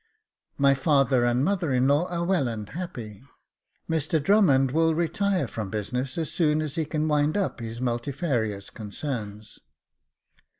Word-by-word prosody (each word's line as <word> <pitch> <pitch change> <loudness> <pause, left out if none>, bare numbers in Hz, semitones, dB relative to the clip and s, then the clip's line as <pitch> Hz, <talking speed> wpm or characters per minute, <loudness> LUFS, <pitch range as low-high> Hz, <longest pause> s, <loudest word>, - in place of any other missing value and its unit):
My 140 -1 +5
father 135 -3 +3
and 120 +3 +2
mother 180 -5 0
in 130 0 +3
law 145 +5 +3
are 170 -1 -2
well 175 -8 +1
and 110 -3 -5
happy. 120 - -7 0.7
Mr 160 0 0
Drummond 140 -7 +4
will 160 +2 +2
retire 175 0 0
from 110 -3 -5
business 125 - -3
as 160 -3 -2
soon 155 -3 +2
as 155 -3 -3
he 160 0 -1
can 155 +1 -1
wind 150 +3 +2
up 195 -8 -1
his 115 0 -6
multifarious 120 - -2
concerns. 105 -1 -6
140 Hz, 145 wpm, -26 LUFS, 120-160 Hz, 0.7 s, My